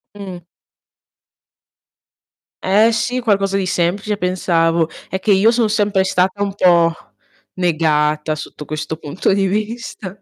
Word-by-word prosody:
Mh. 190 -3 -8 2.2
Eh 210 +5 +4
sì, 245 +3 -1
qualcosa 195 -3 +1
di 190 - -1
semplice 195 +4 -1
pensavo. 170 -3 +1 0.2
È 190 - -2
che 210 - +1
io 200 +3 +5
son 230 -2 +1
sempre 205 -3 +1
stata 190 +2 0
un 200 -1 -3
po' 170 -3 +4 0.6
negata 155 -3 +1
sotto 150 0 -9
questo 155 +1 -4
punto 160 +5 -2
di 195 -1 +1
vista. 210 -2 -4
190 Hz, 125 wpm, -18 LUFS, 170-205 Hz, 2.2 s, io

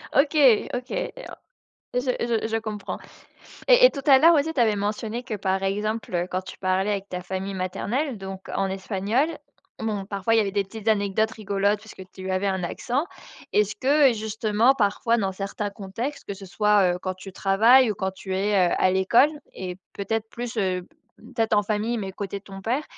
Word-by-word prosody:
OK, 285 +3 +3 0.4
OK 250 0 -5
et - - -2 0.2
o - - -9 0.6
je 250 - +2 0.4
je - - -1
je 225 - 0
comprends 215 -2 -5 0.7
et - - +7
et - - +4
tout 275 - -6
à 270 -2 +8
l'heure 335 +1 +7
aussi 310 +2 +1
tu 255 - 0
avais 215 -3 +3
mentionné 215 +3 -3
que, 240 -4 -5
par 190 -1 -1
exemple, 210 +1 -2
heu, 175 +1 +1
quand 185 - -1
tu - - -10
parlais 190 +2 0
avec 200 -1 -3
ta 180 0 -4
famille 190 +2 -4
maternelle, 215 +9 -2
donc 190 0 -7
en 195 0 0
espagnol, 200 - 0 0.5
bon, 210 -3 -2
parfois 200 +2 -1
il - - +5
y - - +6
avait 200 -2 -1
des 200 -1 +1
petites 215 +2 -10
anecdotes 215 +1 +1
rigolotes 205 0 0
puisque 215 -3 -11
tu 190 0 -6
avais 185 +2 0
un 190 -1 -1
accent. 255 - -2 0.5
Est-ce 210 0 +2
que, 275 +1 +4
justement, 220 +3 +1
parfois 230 0 +1
dans 195 -4 -1
certains 200 +1 -4
contextes 215 +9 -5
que 200 - -4
ce 195 0 -11
soit, 205 -2 +3
heu, 180 - -5
quand 185 0 -3
tu 185 +1 -11
travailles 225 +6 +5
ou - - -1
quand 190 -1 -2
tu 190 0 -6
es, 205 +2 0 0.2
heu, - - +1
à 185 - +4
l'école 195 +10 +4 0.2
et 180 -1 -6 0.2
peut-être 220 +2 -3
plus, 240 -1 -6
heu, 185 -2 0 0.5
peut-être 225 -2 +1
en 205 - +4
famille 220 +3 -1
mais 190 -2 -5
côté 200 0 -5
de 195 - -24
ton 195 -1 -9
père, 255 +8 -1
205 Hz, 205 wpm, -24 LUFS, 195-230 Hz, 0.7 s, à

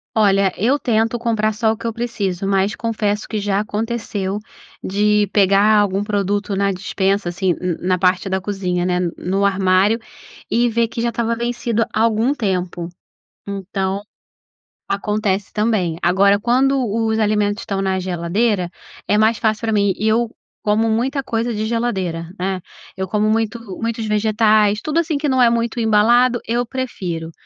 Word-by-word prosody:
Olha, 200 -3 +3
eu 255 +8 +2
tento 225 0 +1
comprar 220 -2 0
só 220 0 +1
o 220 - -3
que 230 - -10
eu 230 - -1
preciso, 200 -6 -3
mas 195 +1 +1
confesso 215 -2 -2
que 215 - -3
já 200 -1 0
aconteceu 210 -2 -3 0.4
de 210 +1 +2
pegar 200 +2 +4
algum 200 0 +1
produto 205 -1 -1
na 200 0 +1
despensa, 190 +1 -1
assim, 180 0 0
na 180 0 -3
na - - -12
parte 185 +1 +2
da 190 - 0
cozinha, 185 -3 -2
né, 180 -1 +1
n 175 -2 -1
no 195 +2 -1
armário, 195 +3 +3 0.5
e 240 +1 +3
ver 230 0 +1
que 230 +1 -5
já 235 - +1
estava 230 0 -1
vencido 235 -1 -1
há 220 - +1
algum 230 +3 +2
tempo. 180 -8 -2 0.6
Então, 195 0 -3 0.9
acontece 200 -1 -1
também. 210 -7 0
Agora, 200 +3 +4
quando 260 +4 +2 0.2
os 220 0 0
alimentos 210 0 +1
estão 195 -3 -3
na 190 -1 0
geladeira, 185 +2 0 0.4
é 210 - +3
mais 220 +1 +3
fácil 215 0 0
pra 220 -1 0
mim 200 -2 +3
e 215 - -1
eu 230 +1 +2 0.4
como 215 +1 +2
muita 260 +5 0
coisa 230 +1 -1
de 215 0 -2
geladeira, 190 -8 -2
né, 185 0 -2 0.4
eu 190 0 -3
como 210 +2 +1
muito 225 +1 0 0.2
muitos 230 -1 -2
vegetais 215 0 +3
tudo 310 +2 0
assim, 310 -3 -1
que 295 - -1
não 260 -1 +3
é 235 - +6
muito 235 +1 -1
embalado, 235 +3 +4
eu 240 +2 0
prefiro. 190 -11 -4
210 Hz, 165 wpm, -19 LUFS, 195-230 Hz, 0.9 s, é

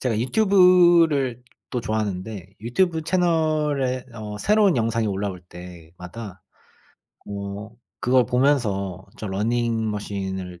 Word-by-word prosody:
제가 115 -4 0
유튜브를 170 - +4 0.3
또 125 - -2
좋아하는데 100 -3 -4
유튜브 160 - 0
채널에 155 -7 0
어 105 -2 -6
새로운 205 - +3
영상이 115 -1 0
올라올 100 -2 -3
때마다 90 +4 -10 0.9
어 100 +1 -6 0.3
그걸 125 0 +3
보면서 105 -8 0
저 110 - -5
러닝머신을 105 -4 -2
115 Hz, 245 characters per minute, -23 LUFS, 100-145 Hz, 0.9 s, 유튜브를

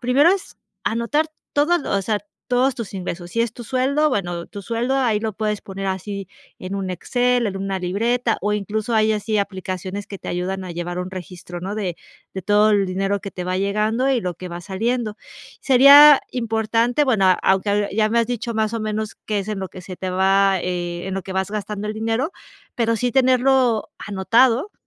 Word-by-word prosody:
primero 270 +7 +4
es 390 - -5 0.3
anotar 235 +8 0 0.3
todo 320 +5 +3
lo - - -4
o 195 - 0
sea, 210 +1 0 0.3
todos 250 +2 +2
tus 220 -5 -7
ingresos. 175 -2 -5
Si 230 - -1
es 230 -1 0
tu 240 - -9
sueldo, 270 +6 +1
bueno, 175 -8 -2
tu 200 - -9
sueldo 235 +6 -1
ahí 230 -6 +1
lo 220 -1 -2
puedes 210 0 -2
poner 195 0 -6
así 195 +1 -4 0.3
en 185 +2 -6
un 190 -2 -3
Excel, 245 +6 +1
en 195 -1 -3
una 195 0 -2
libreta 225 +6 0
o 210 +2 0
incluso 215 +2 -2
hay 220 0 +3
así 215 0 -1
aplicaciones 190 0 -4
que 200 - -7
te - - -12
ayudan 185 +2 -3
a 175 - -6
llevar 175 +1 -4
un 180 +1 -5
registro, 175 -1 -8
¿no?, 195 +4 -4
de 185 -5 -3 0.4
de 190 - -4
todo 210 +1 +4
el 200 -2 +3
dinero 195 +2 -1
que 200 - -7
te 180 - -6
va 185 +1 -1
llegando 215 +6 +1
y 250 -3 +2
lo 180 -3 -3
que 180 +2 -8
va 175 0 -6
saliendo. 215 +3 -2 0.4
Sería 280 +2 +8
importante, 230 +3 +1
bueno, 215 -8 +3
a 185 - +7
aunque 200 +2 +2
ya 215 +1 +2
me 235 +2 +1
has 230 - +2
dicho 240 -1 -3
más 220 0 -1
o 225 - -2
menos 215 0 -3
qué 210 -1 0
es 195 - -7
en 205 -2 -3
lo 190 - -4
que 185 - -11
se 185 0 -8
te 185 -1 -4
va 195 +1 +3
eh, 175 0 -3
en 190 - -3
lo 195 - -3
que 190 - -7
vas 190 +1 -1
gastando 210 0 -4
el 215 - -3
dinero, 225 - -1 0.4
pero 230 -1 +1
sí 245 +2 -1
tenerlo 255 -3 +3
anotado 230 - +2
210 Hz, 210 wpm, -21 LUFS, 190-235 Hz, 0.4 s, Sería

